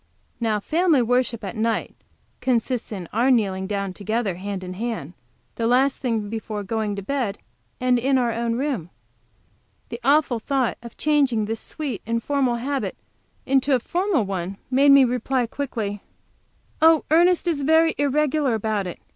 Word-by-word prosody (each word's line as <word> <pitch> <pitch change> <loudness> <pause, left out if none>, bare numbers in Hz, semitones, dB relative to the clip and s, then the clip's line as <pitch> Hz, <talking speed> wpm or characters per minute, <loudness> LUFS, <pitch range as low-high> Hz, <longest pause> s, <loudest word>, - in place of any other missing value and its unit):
Now 220 -3 0
family 315 - +2
worship 245 -1 0
at 195 - -5
night 225 +1 -1 0.4
consists 245 -1 -1
in 185 -5 -5
our 240 +5 +2
kneeling 195 -6 +1
down 200 -2 -2
together 215 +1 -2
hand 195 0 -5
in 185 0 -6
hand, 190 -7 -4 0.4
the 230 - 0
last 260 +3 +3
thing 225 -5 -1
before 215 -1 -5
going 215 0 -2
to 200 - -6
bed, 235 -3 -2 0.4
and 250 -1 +2
in 265 +2 +2
our 240 -2 +1
own 230 0 -1
room. 250 - -2 1.0
The 235 - -6
awful 275 -3 +3
thought 260 0 -1
of 235 -1 -11
changing 275 -8 +2
this 225 +1 -3
sweet, 280 -10 -4
informal 245 +2 0
habit 270 +3 -3 0.5
into 270 +1 +3
a - - +1
formal 350 - 0
one 190 0 -4
made 280 +2 +5
me 275 -1 +8
reply 250 +1 0
quickly: 225 -6 -4 0.8
"Oh, 320 -1 +5
Ernest 350 +2 +4
is 315 -4 0
very 320 +3 +4
irregular 290 -2 +1
about 215 -3 -1
it. 175 - -6
240 Hz, 155 wpm, -23 LUFS, 215-275 Hz, 1.0 s, me